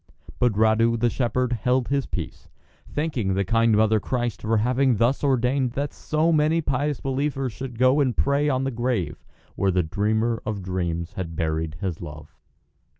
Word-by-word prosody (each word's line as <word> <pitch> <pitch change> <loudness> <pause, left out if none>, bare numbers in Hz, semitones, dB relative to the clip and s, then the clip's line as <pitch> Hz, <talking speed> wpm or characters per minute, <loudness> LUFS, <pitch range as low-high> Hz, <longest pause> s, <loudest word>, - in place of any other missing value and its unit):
But 125 -3 +3
Radu, 110 +2 +3
the 120 0 +2
shepherd, 125 0 0
held 125 +2 0
his 140 -1 0
peace, 85 -4 -6 0.4
thanking 130 -11 -1
the 100 0 0
Kind 115 -1 +3
Mother 110 0 +4
of - - -2
Christ 120 +2 -2
for 110 0 +1
having 125 +3 +2
thus 120 +7 +1
ordained 130 -1 +1
that 140 +2 -3
so 155 +2 0
many 155 +1 +3
pious 145 -1 -1
believers 135 -2 -2
should 130 -2 -7
go 130 +4 +4
and 130 -4 +1
pray 140 +1 +2
on 130 -1 0
the 135 - -1
grave 115 - -2 0.3
where 100 - +1
the 90 -1 +2
dreamer 110 +7 0
of 105 -3 -4
dreams 85 -2 -3
had 85 -3 -5
buried 80 0 -2
his 90 -5 -3
love. 75 -2 -10
120 Hz, 175 wpm, -24 LUFS, 100-135 Hz, 0.4 s, Mother